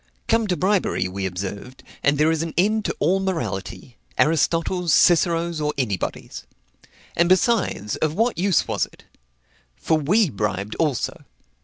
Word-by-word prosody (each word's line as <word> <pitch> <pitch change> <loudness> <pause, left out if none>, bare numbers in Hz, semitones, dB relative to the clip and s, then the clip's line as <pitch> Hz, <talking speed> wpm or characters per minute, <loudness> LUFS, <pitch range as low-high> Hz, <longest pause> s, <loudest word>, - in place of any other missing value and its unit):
Come 230 -1 +2
to 180 -3 0
bribery, 185 - +1
we 95 +1 -3
observed, 100 +7 -7 0.2
and 140 +1 +2
there 155 +2 +3
is 160 -1 0
an 165 -1 -5
end 215 +4 +2
to - - -1
all 185 +6 +2
morality, 120 - -4 0.2
Aristotle's, 165 +2 +1
Cicero's, 170 0 +3
or 150 0 -1
anybody's. 105 -9 -4 0.7
And, 170 +1 +2
besides, 185 - +1
of 155 0 -1
what 230 -1 0
use 190 -3 +2
was - - -1
it? - - -21 0.7
For 160 - 0
we 180 +4 +2
bribed 100 -1 -3
also. 150 -7 -1
160 Hz, 145 wpm, -22 LUFS, 120-185 Hz, 0.7 s, there